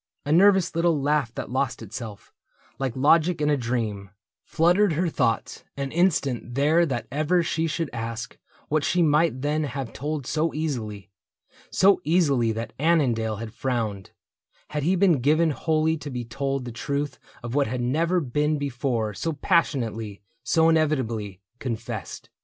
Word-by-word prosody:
A 145 Hz, -, -1 dB
nervous 190 Hz, +1 st, +4 dB
little 165 Hz, -2 st, +2 dB
laugh 145 Hz, -4 st, +1 dB
that -, -, -5 dB
lost 130 Hz, -2 st, -1 dB
itself, 110 Hz, -1 st, -8 dB, 0.5 s
Like 135 Hz, -3 st, -2 dB
logic 160 Hz, +5 st, +3 dB
in 150 Hz, 0 st, +2 dB
a -, -, +4 dB
dream, 115 Hz, -6 st, -2 dB, 0.3 s
fluttered 175 Hz, +3 st, +3 dB
her 170 Hz, +3 st, 0 dB
thoughts 120 Hz, -7 st, -1 dB
An 140 Hz, -1 st, -3 dB
instant 140 Hz, -9 st, 0 dB
there 155 Hz, +5 st, +3 dB
that 125 Hz, -4 st, -3 dB
ever 155 Hz, +5 st, +2 dB
she 165 Hz, 0 st, -1 dB
should 165 Hz, +1 st, -2 dB
ask 115 Hz, +1 st, -5 dB, 0.3 s
What 155 Hz, 0 st, +1 dB
she 175 Hz, +3 st, +2 dB
might 150 Hz, -3 st, +2 dB
then 150 Hz, +1 st, 0 dB
have 135 Hz, -3 st, -5 dB
told 150 Hz, -1 st, -4 dB
so 160 Hz, +4 st, -1 dB
easily 110 Hz, -11 st, -4 dB, 0.3 s
— -, -, -62 dB, 0.2 s
So 195 Hz, +1 st, +4 dB
easily 140 Hz, -8 st, +2 dB
that 115 Hz, 0 st, -5 dB
Annandale 130 Hz, -9 st, +2 dB
had 110 Hz, +1 st, -7 dB
frowned, 115 Hz, -7 st, -2 dB, 0.6 s
Had 150 Hz, 0 st, -2 dB
he 175 Hz, +6 st, +2 dB
been 180 Hz, -6 st, +4 dB
given 155 Hz, +4 st, +3 dB
wholly 160 Hz, +2 st, +1 dB
to 150 Hz, -1 st, -7 dB
be 125 Hz, -3 st, -4 dB
told 135 Hz, +2 st, -3 dB
The 120 Hz, -, -5 dB
truth 140 Hz, +4 st, -3 dB, 0.2 s
of 120 Hz, 0 st, -5 dB
what 140 Hz, 0 st, +2 dB
had 125 Hz, +3 st, -3 dB
never 165 Hz, +9 st, +1 dB
been 150 Hz, +1 st, 0 dB
before 125 Hz, -5 st, -2 dB
So 165 Hz, +10 st, -2 dB
passionately, 115 Hz, -, 0 dB, 0.2 s
so 160 Hz, 0 st, +3 dB
inevitably 125 Hz, -, 0 dB, 0.2 s
Confessed. 115 Hz, -4 st, -5 dB
140 Hz, 160 wpm, -25 LUFS, 120-160 Hz, 0.6 s, nervous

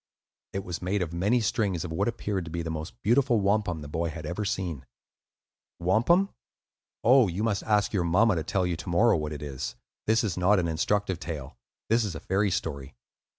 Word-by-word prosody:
It 95 Hz, -, -2 dB
was 90 Hz, -2 st, -5 dB
made 95 Hz, +1 st, 0 dB
of 85 Hz, -1 st, -6 dB
many 100 Hz, +8 st, +2 dB
strings 100 Hz, -6 st, 0 dB
of 85 Hz, -, -6 dB
what 95 Hz, +5 st, 0 dB
appeared 105 Hz, -6 st, -2 dB
to -, -, -7 dB
be 85 Hz, +1 st, -3 dB
the 80 Hz, -, -3 dB
most 80 Hz, +1 st, -6 dB
beautiful 120 Hz, +2 st, +3 dB
wampum 100 Hz, -5 st, +1 dB
the 75 Hz, -, -7 dB
boy 85 Hz, +3 st, -2 dB
had 80 Hz, 0 st, -7 dB
ever 90 Hz, +7 st, -3 dB
seen. 90 Hz, -7 st, -3 dB, 0.9 s
(Wampum? 120 Hz, -, +3 dB, 0.7 s
Oh, 125 Hz, -1 st, +6 dB
you 95 Hz, +4 st, -2 dB
must 105 Hz, -4 st, +1 dB
ask 105 Hz, -1 st, +1 dB
your 95 Hz, -4 st, +1 dB
mamma 100 Hz, +7 st, +4 dB
to 80 Hz, -3 st, -1 dB
tell 95 Hz, +2 st, 0 dB
you 90 Hz, -1 st, 0 dB
to 90 Hz, -, -7 dB
morrow 105 Hz, +6 st, +4 dB
what 75 Hz, -2 st, -2 dB
it 75 Hz, -1 st, -6 dB
is; 65 Hz, -4 st, -5 dB, 0.3 s
this 110 Hz, +1 st, +3 dB
is 100 Hz, -6 st, -2 dB
not 95 Hz, +3 st, +4 dB
an 90 Hz, -2 st, +1 dB
instructive 95 Hz, +3 st, 0 dB
tale, 75 Hz, -7 st, -6 dB, 0.3 s
this 115 Hz, +1 st, +3 dB
is 100 Hz, -6 st, -3 dB
a -, -, -5 dB
fairy 100 Hz, +2 st, +1 dB
story.) 70 Hz, -6 st, -3 dB
95 Hz, 205 wpm, -27 LUFS, 85-105 Hz, 0.9 s, Oh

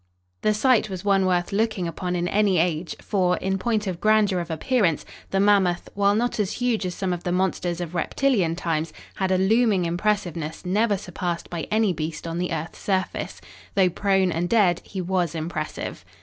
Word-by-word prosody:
The 215 Hz, 0 st, +2 dB
sight 235 Hz, -1 st, +3 dB
was 190 Hz, 0 st, -6 dB
one 195 Hz, -2 st, +3 dB
worth 175 Hz, -1 st, +1 dB
looking 205 Hz, -3 st, 0 dB
upon 180 Hz, +2 st, -3 dB
in 175 Hz, 0 st, 0 dB
any 200 Hz, -1 st, +2 dB
age, 165 Hz, 0 st, 0 dB
for, 180 Hz, -3 st, +1 dB
in 190 Hz, 0 st, -1 dB
point 220 Hz, 0 st, 0 dB
of 185 Hz, -3 st, -4 dB
grandeur 215 Hz, -3 st, +3 dB
of 170 Hz, -1 st, -5 dB
appearance, 170 Hz, -, +1 dB, 0.2 s
the 195 Hz, -, 0 dB
mammoth, 195 Hz, -3 st, +3 dB
while 200 Hz, 0 st, +3 dB
not 240 Hz, +1 st, 0 dB
as 200 Hz, -1 st, 0 dB
huge 240 Hz, -6 st, 0 dB
as 180 Hz, -, -5 dB
some 190 Hz, -2 st, -1 dB
of 175 Hz, -, -5 dB
the 175 Hz, -, -1 dB
monsters 180 Hz, -1 st, 0 dB
of 175 Hz, -1 st, -5 dB
reptilian 180 Hz, -, +1 dB
times, 165 Hz, -2 st, -2 dB, 0.2 s
had 190 Hz, -1 st, 0 dB
a 185 Hz, -, +4 dB
looming 200 Hz, -1 st, +3 dB
impressiveness 175 Hz, -3 st, -2 dB
never 205 Hz, +3 st, +2 dB
surpassed 175 Hz, -2 st, -4 dB
by 170 Hz, -2 st, -4 dB
any 215 Hz, -3 st, +2 dB
beast 155 Hz, 0 st, -5 dB
on 165 Hz, +1 st, -3 dB
the 180 Hz, 0 st, -2 dB
earth's 160 Hz, 0 st, -4 dB
surface. 190 Hz, -2 st, -2 dB, 0.3 s
Though 190 Hz, -2 st, +4 dB
prone 190 Hz, -1 st, +2 dB
and 170 Hz, +2 st, -1 dB
dead 195 Hz, -7 st, +3 dB
he 190 Hz, -, -5 dB
was 175 Hz, -2 st, -1 dB
impressive. 155 Hz, -1 st, -4 dB
185 Hz, 190 wpm, -24 LUFS, 175-205 Hz, 0.3 s, a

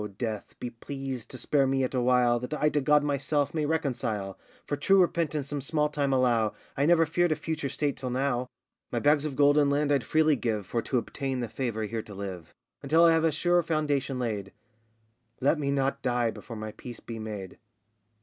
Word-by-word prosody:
Death, 110 Hz, -3 st, -4 dB
be 125 Hz, -, -5 dB
pleased 135 Hz, 0 st, -6 dB
to 130 Hz, -, -8 dB
spare 135 Hz, +2 st, +2 dB
me 135 Hz, 0 st, +1 dB
yet 130 Hz, -, -1 dB
awhile, 125 Hz, -1 st, +3 dB
That 125 Hz, +5 st, -4 dB
I 150 Hz, 0 st, +2 dB
to 150 Hz, -1 st, 0 dB
God 150 Hz, +1 st, +4 dB
myself 145 Hz, 0 st, 0 dB
may 155 Hz, -2 st, 0 dB
reconcile, 120 Hz, -10 st, -2 dB, 0.3 s
For 145 Hz, -, -1 dB
true 195 Hz, +7 st, +4 dB
repentance 160 Hz, -5 st, +1 dB
some 145 Hz, -1 st, -3 dB
small 150 Hz, +2 st, +1 dB
time 145 Hz, -2 st, -1 dB
allow; 120 Hz, -5 st, +2 dB, 0.2 s
I 140 Hz, +2 st, +1 dB
never 165 Hz, -1 st, +5 dB
feared 175 Hz, +2 st, +1 dB
a -, -, +3 dB
future 155 Hz, -2 st, -3 dB
state 145 Hz, -1 st, -1 dB
till 130 Hz, 0 st, -4 dB
now! 125 Hz, -1 st, 0 dB, 0.4 s
My -, -, -2 dB
bags 145 Hz, 0 st, +3 dB
of 145 Hz, -3 st, -3 dB
gold 145 Hz, +1 st, +5 dB
and 145 Hz, -1 st, +3 dB
land 145 Hz, +1 st, +1 dB
I'd 140 Hz, -4 st, +2 dB
freely 155 Hz, +4 st, +3 dB
give, 110 Hz, -5 st, -2 dB
For 115 Hz, +5 st, -1 dB
to 130 Hz, -, -1 dB
obtain 135 Hz, +2 st, -3 dB
the 120 Hz, -, -2 dB
favour 110 Hz, -1 st, -3 dB
here 110 Hz, +2 st, -3 dB
to 105 Hz, -2 st, -11 dB
live, 95 Hz, -4 st, -7 dB, 0.3 s
Until 160 Hz, +5 st, +4 dB
I 165 Hz, -, +7 dB
have 165 Hz, 0 st, +3 dB
a 165 Hz, -, +3 dB
sure 175 Hz, +3 st, +2 dB
foundation 145 Hz, -5 st, -1 dB
laid. 105 Hz, -6 st, -3 dB, 0.9 s
Let 140 Hz, +4 st, +2 dB
me 140 Hz, -2 st, -1 dB
not 140 Hz, 0 st, 0 dB
die 120 Hz, -2 st, +1 dB
before 115 Hz, -, -9 dB
my 110 Hz, 0 st, -5 dB
peace 120 Hz, +2 st, -10 dB
be 115 Hz, -1 st, -7 dB
made! 105 Hz, -4 st, -7 dB
135 Hz, 205 wpm, -28 LUFS, 120-150 Hz, 0.9 s, I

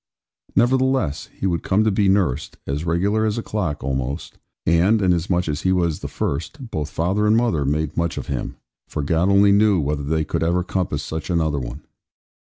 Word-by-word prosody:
Nevertheless, 130 Hz, -, +2 dB
he -, -, -6 dB
would 85 Hz, -3 st, 0 dB
come 100 Hz, +3 st, +2 dB
to 110 Hz, -, +2 dB
be 100 Hz, 0 st, +2 dB
nursed, 80 Hz, -8 st, 0 dB
as 75 Hz, +4 st, -3 dB
regular 100 Hz, +6 st, +1 dB
as 110 Hz, 0 st, 0 dB
a 115 Hz, -, -2 dB
clock, 85 Hz, -10 st, -3 dB
almost; 65 Hz, +3 st, -3 dB, 0.3 s
and, 90 Hz, +7 st, +4 dB
inasmuch 90 Hz, -1 st, +1 dB
as 75 Hz, -1 st, -2 dB
he 95 Hz, -, +1 dB
was 85 Hz, -4 st, +1 dB
the -, -, -5 dB
first, 115 Hz, -, -4 dB
both 75 Hz, -1 st, -3 dB
father 95 Hz, +7 st, 0 dB
and 110 Hz, +1 st, +4 dB
mother 100 Hz, -, +1 dB
made 75 Hz, +2 st, -1 dB
much 85 Hz, 0 st, -1 dB
of -, -, -4 dB
him; -, -, -4 dB, 0.3 s
for 75 Hz, -, -3 dB
God 85 Hz, +5 st, +1 dB
only 100 Hz, 0 st, +5 dB
knew 100 Hz, -2 st, +4 dB
whether 75 Hz, 0 st, -1 dB
they 80 Hz, +3 st, 0 dB
could -, -, -2 dB
ever 85 Hz, +2 st, +1 dB
compass 90 Hz, -5 st, -2 dB
such 80 Hz, +2 st, -5 dB
another 80 Hz, -4 st, +1 dB
one. 65 Hz, -, -7 dB
85 Hz, 195 wpm, -22 LUFS, 75-100 Hz, 0.3 s, only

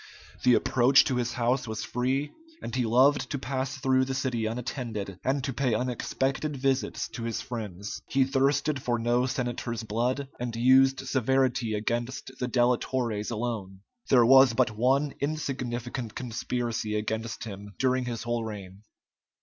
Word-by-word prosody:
The 125 Hz, -1 st, +5 dB
approach 130 Hz, +2 st, +5 dB
to 130 Hz, -, 0 dB
his 120 Hz, -1 st, -1 dB
house 125 Hz, +2 st, 0 dB
was 110 Hz, 0 st, -4 dB
free, 130 Hz, +4 st, -1 dB, 0.3 s
and 115 Hz, -, -7 dB
he 125 Hz, -3 st, +1 dB
loved 130 Hz, +3 st, +4 dB
to -, -, -2 dB
pass 135 Hz, +1 st, -3 dB
through 130 Hz, -1 st, +2 dB
the 135 Hz, 0 st, -3 dB
city 125 Hz, -4 st, -1 dB
unattended, 115 Hz, -5 st, -4 dB
and 135 Hz, +1 st, 0 dB
to 135 Hz, -1 st, -2 dB
pay 125 Hz, -3 st, +1 dB
unexpected 130 Hz, +4 st, -1 dB
visits 135 Hz, -4 st, 0 dB
to 120 Hz, -, -7 dB
his 115 Hz, -1 st, -2 dB
friends. 105 Hz, -5 st, -6 dB
He 135 Hz, -, +3 dB
thirsted 140 Hz, +1 st, +1 dB
for 120 Hz, -1 st, 0 dB
no 120 Hz, +2 st, +1 dB
senator's 120 Hz, -2 st, -3 dB
blood, 120 Hz, +6 st, -1 dB
and 120 Hz, -1 st, -3 dB
used 130 Hz, +2 st, +4 dB
severity 130 Hz, -3 st, +1 dB
against 120 Hz, +5 st, -3 dB
the 125 Hz, -, -1 dB
delatores 120 Hz, -3 st, 0 dB
alone. 105 Hz, -5 st, -4 dB, 0.3 s
There 125 Hz, -3 st, +6 dB
was 130 Hz, 0 st, +7 dB
but 125 Hz, -1 st, +3 dB
one 135 Hz, +5 st, +2 dB
insignificant 125 Hz, -5 st, -3 dB
conspiracy 120 Hz, -2 st, -3 dB
against 110 Hz, +2 st, -3 dB
him 100 Hz, -2 st, -8 dB
during 130 Hz, -1 st, +1 dB
his 120 Hz, -2 st, -4 dB
whole 120 Hz, -1 st, -1 dB
reign. 100 Hz, -3 st, -8 dB
125 Hz, 150 wpm, -28 LUFS, 115-130 Hz, 0.3 s, was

